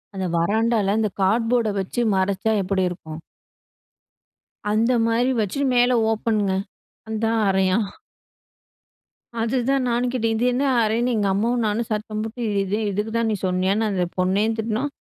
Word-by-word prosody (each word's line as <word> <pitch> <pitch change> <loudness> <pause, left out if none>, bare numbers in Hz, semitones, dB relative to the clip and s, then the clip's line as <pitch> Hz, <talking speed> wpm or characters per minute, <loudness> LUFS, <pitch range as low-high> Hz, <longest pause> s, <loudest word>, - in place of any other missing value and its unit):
அந்த 190 - -2
வராண்டால 210 +2 +1
அந்த 215 -2 0
கார்ட்போர்ட 225 +2 +2
வச்சு 190 +5 -3
மறைச்சா 195 +3 0
எப்படி 190 0 0
இருக்கும்? 160 -3 -8 1.5
அந்த 225 +3 +2 0.2
மாரி 240 +3 +2
வச்சு, 210 +6 -3
மேல 245 0 +4 0.2
ஓப்பன்ங்க, 215 -2 0 0.6
அதான் 225 +1 0
அறையாம். 190 +2 +2 1.5
அதுதான் 255 +3 +1
நானும் 240 +1 0
கேட்டேன். 230 -3 0
இது 225 - -1
என்ன 275 +3 0 0.2
அறைன்னு 230 +3 +1
எங்க 205 -2 +1
அம்மாவும் 230 +4 0
நானும் 220 +2 -1
சத்தம் 215 0 -3
போட்டு, 225 +3 -6 0.2
இது 195 +2 -2
இதுக்கு 210 +3 -2
தான் 230 -1 +1
நீ - - 0
சொன்னியான்னு 190 +4 +1
அந்த 185 -2 0
பொண்ணயும் 200 +5 +1
திட்டுனோம். 225 +6 -2
220 Hz, 135 wpm, -22 LUFS, 195-230 Hz, 1.5 s, மேல